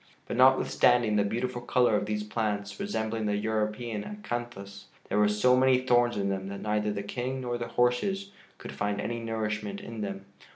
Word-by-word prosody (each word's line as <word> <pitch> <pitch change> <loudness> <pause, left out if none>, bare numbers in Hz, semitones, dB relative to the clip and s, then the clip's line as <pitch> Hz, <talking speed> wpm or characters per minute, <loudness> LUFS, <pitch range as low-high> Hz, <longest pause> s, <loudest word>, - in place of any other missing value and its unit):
But - - -4
notwithstanding 125 -3 +4
the 105 - +3
beautiful 120 +4 -2
color 120 -2 +3
of 105 - 0
these 105 0 -1
plants, 105 -2 -3
resembling 110 - -2
the 105 - +1
European 110 +1 -2
acanthus, 120 - -6 0.2
there 105 - +1
were 105 0 +5
so 115 +5 +4
many 130 0 +5
thorns 120 -2 +3
in 100 -1 0
them 95 0 -3
that 100 0 -6
neither 105 0 0
the 100 -1 -3
King 125 +5 -3
nor 120 -1 -3
the 120 - -3
horses 125 +13 0 0.3
could - - -8
find 105 0 -2
any 115 +3 -3
nourishment 105 -3 -3
in 115 -1 -7
them. 100 -1 -5
110 Hz, 180 wpm, -28 LUFS, 105-120 Hz, 0.3 s, were